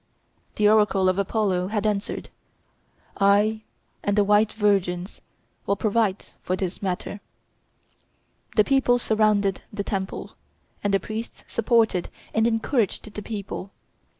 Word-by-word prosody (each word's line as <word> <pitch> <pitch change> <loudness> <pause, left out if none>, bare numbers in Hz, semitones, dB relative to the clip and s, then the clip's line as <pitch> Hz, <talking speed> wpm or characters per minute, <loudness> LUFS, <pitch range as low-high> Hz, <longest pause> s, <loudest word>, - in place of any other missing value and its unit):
The 210 - +3
oracle 210 -3 +4
of 185 +1 0
Apollo 195 -3 0
had 210 +1 -2
answered, 205 -1 -2 0.9
"I 205 +2 +3 0.4
and 205 0 0
the 205 - +5
white 210 +1 +4
virgins 195 -3 0 0.5
will 200 - +2
provide 210 -2 0 0.2
for 185 - -1
this 185 -1 -4
matter." 195 +1 -3 1.4
The 215 - +6
people 265 -1 +3
surrounded 215 -4 +2
the 205 -1 -3
temple, 195 -1 -4 0.5
and 205 - +1
the 195 - +3
priests 220 +2 -6
supported 225 -5 +2 0.2
and 220 +1 +3
encouraged 225 -2 0
the 210 - -5
people. 200 -2 -6
205 Hz, 125 wpm, -24 LUFS, 195-220 Hz, 1.4 s, The